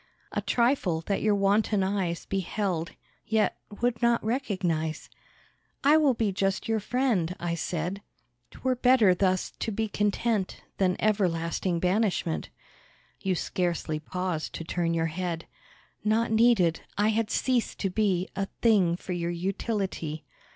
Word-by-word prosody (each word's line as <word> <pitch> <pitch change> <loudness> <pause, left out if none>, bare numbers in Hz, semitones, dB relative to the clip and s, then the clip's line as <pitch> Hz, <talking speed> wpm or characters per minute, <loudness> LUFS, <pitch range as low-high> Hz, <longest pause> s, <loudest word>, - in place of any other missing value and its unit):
A - - -1
trifle, 235 - +1
that 195 +4 -1
your 210 -1 +3
wanton 200 0 +2
eyes 190 -3 -1
Beheld, 190 -3 -2 0.3
yet 220 -1 +1 0.2
would 240 -1 +1
not 235 0 +3
recognise. 180 - -1 0.7
"I 290 +2 +6
will 290 -5 +4
be 220 -3 +1
just 195 +2 -1
your 225 -1 +1
friend," 210 -7 0
I 170 -1 -2
said, 175 +3 -3 0.5
"'Twere 260 0 -1
better 245 -6 +5
thus 185 0 +1
to 225 - -2
be 220 +2 -1
content 210 0 -1 0.2
Than 185 -2 +3
everlasting 175 -4 +1
banishment." 185 -2 0 0.7
You 190 -2 0
scarcely 170 -3 -1
paused 180 0 -3
to - - -4
turn 170 0 -1
your 165 0 +1
head. 165 0 -3 0.6
Not 220 +2 +2
needed, 220 -7 +4 0.2
I 210 +1 +3
had 220 0 +1
ceased 245 +2 0
to 195 - 0
be 190 -3 +1
A 195 0 -1
thing 200 -7 +4
for 185 - -5
your 170 -1 -2
utility! 185 -3 -3
195 Hz, 135 wpm, -28 LUFS, 175-220 Hz, 0.7 s, I